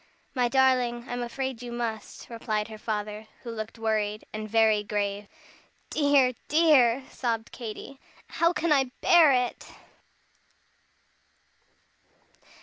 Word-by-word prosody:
"My 250 -2 +2
darling, 250 -2 +2
I'm 245 0 -4
afraid 250 0 -4
you 245 -1 -7
must," 230 -3 -5
replied 215 -2 -3
her 215 -1 -9
father, 210 0 -4 0.2
who 235 - -6
looked 220 0 -6
worried, 215 -1 -1
and 215 0 -5
very 220 -1 +4
grave. 205 -1 -3 0.6
"Dear, 285 -4 +3
dear!" 275 -6 +4
sobbed 230 -3 -3
Katy, 245 +3 -8 0.3
"how 335 0 +1
can 335 -2 -1
I 275 -3 +4 0.2
bear 335 -4 +7
it?" 250 -2 -1
235 Hz, 115 wpm, -27 LUFS, 215-265 Hz, 0.6 s, bear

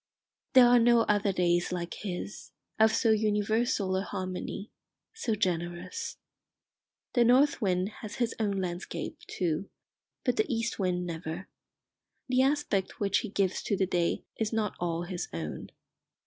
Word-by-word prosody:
There 255 -1 +9
are 240 0 +6
no 235 0 +5
other 205 -2 +2
days 175 -1 +1
like 175 -1 -3
his, 195 0 -6 0.3
of 220 0 +6
so 225 0 +3
universal 210 -1 +1
a 190 - +1
harmony, 190 +1 -5 0.4
so 245 - -1
generous. 175 - -2 1.0
The 240 - +5
north 255 +4 +4
wind 185 -1 +1
has 210 -2 -6
his 240 -2 0
own 200 -3 0
landscape, 175 -1 -4
too; 175 +1 -2 0.6
but - - +1
the 430 -7 +1
east 230 -1 -1
wind 180 -2 0
never. 165 +2 -5 0.8
The 255 0 +3
aspect 270 -9 0
which 200 -1 +2
he 220 - -5
gives 195 -2 0
to 200 - -1
the 190 - +2
day 175 -2 0 0.2
is 220 -1 0
not 220 -3 0
all 170 -1 -1
his 175 0 -4
own. 80 -2 -5
200 Hz, 150 wpm, -29 LUFS, 180-225 Hz, 1.0 s, There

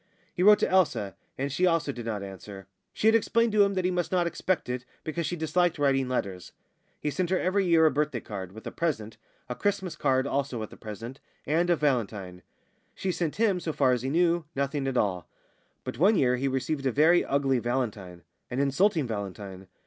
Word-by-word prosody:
He 180 - -3
wrote 210 +2 +8
to - - +1
Elsa, 165 - +1 0.2
and 140 +1 -2
she 180 +6 +2
also 165 -4 +1
did 120 -3 -7
not 105 -3 -3
answer 95 0 -9 0.3
she - - -4
had 220 - +6
explained 230 +1 +2
to 210 0 +4
him 200 0 0
that 185 -1 0
he 185 - +2
must 175 -3 -1
not 180 -2 +2
expect 175 +1 -1
it, 125 0 -3 0.2
because 160 +1 -3
she 175 - -2
disliked 175 +1 +1
writing 135 -3 +1
letters. 95 -8 -3 0.5
He 150 - -2
sent 180 +3 -1
her 185 - +2
every 190 +1 +1
year 165 -2 +5
a 155 - +5
birthday 145 -3 -1
card 95 -5 -7
(with 110 +3 -12
a - - -4
present), 115 -10 -2 0.3
a 125 - -3
Christmas 195 +3 -2
card 130 0 +1
(also 140 -2 -1
with 110 - -6
a - - -10
present), 115 +4 -8 0.3
and 165 +4 +1
a 175 - +5
valentine. 105 - -1 0.5
She 190 - -2
sent 170 -3 -2
him, 205 -4 +2
so 160 -3 -3
far 130 - +3
as 125 -2 +1
he 130 - -2
knew, 170 +1 +2
nothing 140 0 -1
at 130 -1 -1
all; 90 -7 -1 0.5
but - - -6
one 200 +6 +5
year 125 -7 +3
he 135 +2 -1
received 135 +2 -1
a - - +2
very 160 +7 +4
ugly 135 -2 +1
valentine, 110 -8 -3 0.3
an 125 - -3
insulting 155 +4 +2
valentine. 100 -3 -6
140 Hz, 210 wpm, -27 LUFS, 115-175 Hz, 0.5 s, wrote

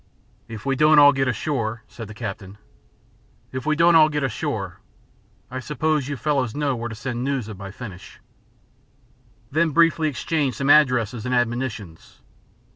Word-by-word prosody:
"If 110 0 -9
we 135 -1 +1
don't 150 +2 +5
all 145 -1 +8
get 135 -1 0
ashore 120 -3 -2
" - - -37
said 115 -3 -7
the 105 - -11
captain. 100 -3 -7 0.9
"If 130 +2 -5
we 155 - +2
don't 170 +2 +5
all 155 -1 +6
get 150 -1 -2
ashore, 130 -4 -3 0.7
I 130 - -4
suppose 150 +1 -1
you 145 -1 -4
fellows 135 -4 -1
know 145 -2 0
where 120 0 -5
to 115 - -7
send 120 +1 -4
news 135 -5 -2
of 105 -4 -9
my 100 -1 -7
finish?" 100 -3 -10 1.3
They 155 - 0
then 170 -1 +3
briefly 165 -1 +3
exchanged 145 -1 -2
some 140 +1 +2
addresses 125 -6 +3
and 125 - 0
admonitions. 120 -8 -3
130 Hz, 170 wpm, -23 LUFS, 115-150 Hz, 1.3 s, all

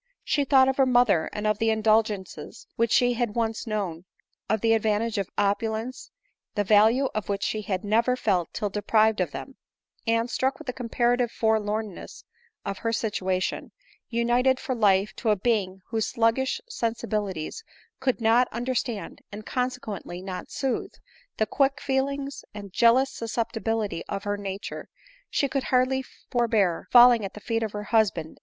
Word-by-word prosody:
She 290 -2 +1
thought 265 -1 +5
of 265 - 0
her 270 -1 +4
mother, 245 -10 +3
of 210 0 -1
the 225 -1 +2
indulgences 215 -3 0
which 230 0 +1
she 245 0 +4
had 235 -3 -2
once 230 0 -1
known, 190 -6 -3 0.4
of 220 0 +1
the 225 -1 +4
advantages 220 0 +1
of 195 - -3
opulence, 220 +4 -1 0.5
the 205 - +1
value 220 +6 +4
of 215 -1 -4
which 200 -1 -1
she 215 - -1
bad 190 -3 -1
never 230 +4 +2
felt 185 -9 0
till 205 -3 -3
deprived 215 0 +2
of 175 - 0
them; 265 - -8 0.5
and, 230 +1 +2
struck 265 +2 -1
with 310 - -11
the 250 - -3
comparative 240 0 +1
forlornness 215 -2 -2 0.4
of 200 -1 -4
her 230 - -1
situation 190 -5 -2 0.4
united 245 +2 +2
for 270 - -3
life 205 -3 +3
to 225 - -1
a 210 - +5
being 195 -3 -1
whose 225 -2 0
sluggish 235 - +1
sensibilities 225 - -3 0.4
could 260 -2 0
not 230 +2 +4
understand, 240 -2 -3
and 210 +1 -8
consequently 250 -8 -3
not 185 0 -6
sooth, 265 -2 -2 0.4
the 220 - +2
quick 275 +5 +1
feelings 275 +1 -2
and 200 -3 -8
jealous 250 +5 +4
susceptibility 225 -4 -2
of 200 -1 -3
her 205 0 -1
nature— 200 -1 -6 0.4
she 280 - +1
could 270 -1 -2
hardly 260 +1 +2 0.3
forbear 220 -8 +1
falling 240 -2 +7
at 195 - -6
the - - -7
feet 225 +2 -2
of 220 -2 -3
her 210 0 -4
husband 220 -2 +3
ADELINE 160 - -10
MOWBRAY. - - -20
225 Hz, 165 wpm, -26 LUFS, 205-245 Hz, 0.5 s, falling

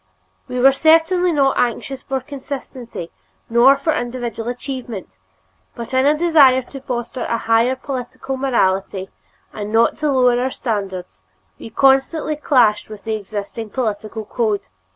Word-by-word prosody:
We 250 - -5
were 270 +2 +7
certainly 325 +5 +3
not 275 -4 +2
anxious 250 +2 -1
for 265 -1 -3
consistency 260 - -7 0.4
nor 250 +4 +6
for 310 +3 0
individual 240 -3 -4
achievement, 245 - -6 0.6
but 235 +2 -7
in 260 +1 +3
a 300 +1 +3
desire 290 -6 +5
to 270 +2 -10
foster 245 -1 -4
a 230 - -1
higher 230 +3 +2
political 255 0 -5
morality 195 -7 0 0.4
and 210 0 -5
not 225 +1 +3
to 300 -1 0
lower 250 -2 +3
our 260 - 0
standards, 195 - -4 0.4
we - - -9
constantly 270 +6 +2
clashed 245 -9 +2
with 215 -2 -10
the 225 - -2
existing 215 +1 -5
political 215 -2 -3
code. 215 - -1
250 Hz, 140 wpm, -19 LUFS, 220-270 Hz, 0.6 s, were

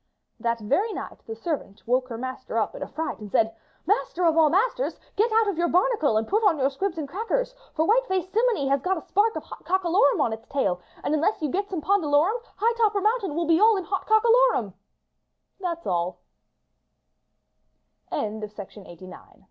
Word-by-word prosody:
" - - -54
That 235 -1 -1
very 360 - 0
night - - -7
the 225 - -5
servant 225 - -5
woke 255 +2 +1
her 230 -3 -6
master 255 +2 -5
up - - 0
in - - -9
a - - -3
fright 320 +1 -4
and 210 -2 -9
said, 225 0 +2 0.3
"Master 370 -4 0
of 325 -1 +4
all 320 -2 +5
masters, - - 0 0.2
get 445 +3 +2
out 445 0 +3
of 380 -5 -2
your 345 - +2
barnacle 355 - +2
and 220 - -1
put 425 +3 +1
on 375 -7 +4
your 270 0 +1
squibs 360 +5 -3
and 305 -3 -3
crackers. 455 - -2 0.2
For 315 - +2
white - - +3
faced 375 -1 -2
simminy 450 - +2
has 275 0 +2
got 375 +5 0
a 320 - -7
spark 430 +3 +2
of - - -4
hot - - -11
cocka 370 -1 0
lorum 320 -7 +4
on 225 - +1
its 225 +1 -9
tail, 195 -11 -1 0.2
and - - 0
unless 325 +8 +1
you 300 - 0
get 400 +2 -2
some 360 -5 -3
pondalorum 370 +3 +2 0.2
high 455 +4 +2
topper 425 -3 +2
mountain 420 -5 0
will 340 +1 0
be 325 +1 +3
all 435 0 +5
on 380 - -3
hot 390 +1 -3
cockaloru 455 - +4
360 Hz, 190 wpm, -25 LUFS, 280-430 Hz, 0.3 s, all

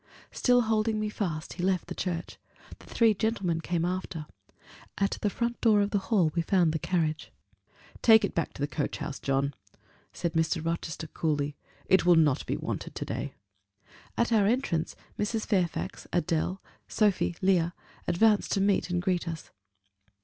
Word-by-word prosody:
Still 245 -1 +3
holding 220 -1 +1
me 215 0 -1
fast, 170 -7 -3
he 175 - -5
left 185 -2 +1
the 175 - -6
church: 175 -2 -4 0.4
the - - -16
three 225 -2 +3
gentlemen 195 -6 -1
came 170 0 -1
after. 180 -3 -3 0.7
At 200 0 0
the 205 - +2
front 235 +3 -2
door 220 -3 +5
of 205 0 +1
the 205 - +2
hall 185 -9 +3
we 170 - +1
found 170 -2 +2
the 160 - -1
carriage. 155 -2 -1 0.7
"Take 220 -1 +7
it - - -5
back 165 - -1
to - - -9
the - - +1
coach 150 -1 -3
house, 150 -2 -5
John," 135 +1 0 0.6
said 170 -2 -3
Mr. 160 0 0
Rochester, 165 -1 -3
coolly: 150 -2 -1 0.3
"it 190 - +4
will 175 0 +6
not 155 -5 +3
be - - -1
wanted - - -5
to - - -4
day." - - -4 0.8
At 235 0 +1
our 205 -3 +4
entrance, 205 -9 0 0.2
Mrs. 215 +1 -1
Fairfax, 180 -5 -1
Adèle, 175 +1 0 0.3
Sophie, 205 -5 +1
Leah, 180 -2 +2 0.3
advanced 210 +4 +3
to - - +1
meet 200 -2 +2
and 175 0 -1
greet 180 -1 0
us. 165 -1 -6
180 Hz, 170 wpm, -28 LUFS, 165-210 Hz, 0.8 s, Take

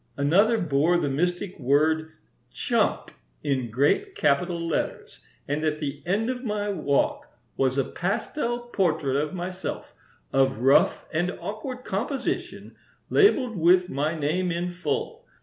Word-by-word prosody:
Another 195 +11 +4
bore 160 0 +2
the 145 -5 -1
mystic 175 +6 -1
word 155 +4 +2 0.4
'Chump' - - 0 0.3
in 130 -4 -1
great 145 - +1
capital 175 - +1
letters, 165 - -3 0.3
and 145 +2 -1
at 155 -1 0
the 145 -1 -4
end 205 +5 +1
of 255 0 -3
my 210 -3 -2
walk 150 -8 0 0.3
was 130 0 +1
a 135 - +3
pastel 235 - -2
portrait 155 -8 +1
of 150 +5 -1
myself, 180 +1 -5 0.4
of 135 -3 +3
rough 135 +2 +4
and 175 +3 +1
awkward 250 +5 -6
composition, 245 +7 -3 0.4
labelled 275 - +4
with 180 +1 +4
my 150 +4 -1
name 160 +5 0
in 175 +1 -2
full. 450 - -3
175 Hz, 130 wpm, -25 LUFS, 145-205 Hz, 0.4 s, Another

